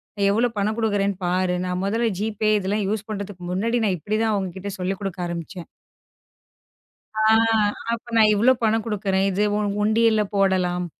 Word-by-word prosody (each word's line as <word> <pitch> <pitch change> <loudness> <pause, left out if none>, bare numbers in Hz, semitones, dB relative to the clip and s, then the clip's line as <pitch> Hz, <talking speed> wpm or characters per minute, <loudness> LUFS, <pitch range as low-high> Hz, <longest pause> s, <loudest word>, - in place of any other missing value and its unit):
நான் 200 -1 +1
எவ்ளோ 235 +4 +2
பணம் 210 +2 0
கொடுக்குறேன்னு 200 -3 0
பாரு. 180 0 +1
நான் 180 0 -2
முதல்ல 225 +3 0
ஜிபே 215 0 0
இதெல்லாம் 200 +2 -1
யூஸ் 215 0 -3
பண்றதுக்கு 200 -3 -6
முன்னாடி, 230 +6 0
நான் 190 -3 0
இப்படி 210 +7 -2
தான் 220 -1 +1
அவங்க 195 -2 -1
கிட்ட 195 +2 -5
சொல்லிக்கொடுக்க 190 0 -3
ஆரம்பிச்சேன் 170 +1 -7 1.5
ஆ, 215 0 -1 0.7
அப்ப 230 - -5
நான் 215 -1 +6
இவ்ளோ 230 +5 +4
பணம் 220 0 +2
கொடுக்கிறேன். 195 -3 0
இது 200 +3 0 0.4
ஒண்டியில 220 0 +3
போடலாம். 185 -2 +1
200 Hz, 155 wpm, -23 LUFS, 185-215 Hz, 1.5 s, நான்